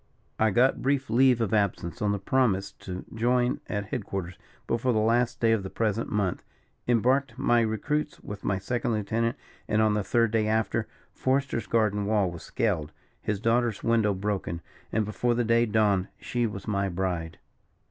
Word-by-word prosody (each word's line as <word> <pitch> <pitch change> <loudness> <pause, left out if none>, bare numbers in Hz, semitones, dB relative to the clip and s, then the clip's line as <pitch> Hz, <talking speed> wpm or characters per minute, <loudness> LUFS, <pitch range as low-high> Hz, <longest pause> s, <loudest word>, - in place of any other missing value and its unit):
I 110 - +4
got 125 +6 +3
brief 135 -2 0
leave 125 0 +4
of 115 -1 0
absence 100 0 0
on 105 -1 +2
the 100 - 0
promise 100 -2 +1
to 90 0 -7
join 120 +2 +1
at 105 0 -3
head 120 -2 -2
quarters 95 -2 -5 0.3
before 120 +2 0
the - - +1
last 115 +3 +2
day 115 -1 +3
of 110 -2 +2
the 95 - -6
present 110 +1 -1
month 100 -4 -1 0.4
embarked 125 +2 +2
my 120 -3 +3
recruits 145 +8 -1
with 105 0 -8
my 100 - 0
second 120 +4 -1
lieutenant; 115 +4 -1 0.3
and 105 - +1
on 110 -1 +4
the 105 -1 0
third 115 +3 +2
day 110 -1 +1
after, 110 0 0 0.3
Forester's 130 -3 0
garden 105 -3 +1
wall 105 -4 +2
was 85 - -9
scaled, 90 -10 -1 0.3
his 105 -2 -2
daughter's 115 0 +1
window 110 -3 +2
broken, 95 -4 -3 0.3
and 110 -1 +1
before 120 +3 0
the 120 - +1
day 115 +1 +3
dawned 105 -3 +2
she 120 -1 -1
was 100 -1 -7
my 100 -2 0
bride. 85 -3 -3
110 Hz, 180 wpm, -27 LUFS, 100-120 Hz, 0.4 s, I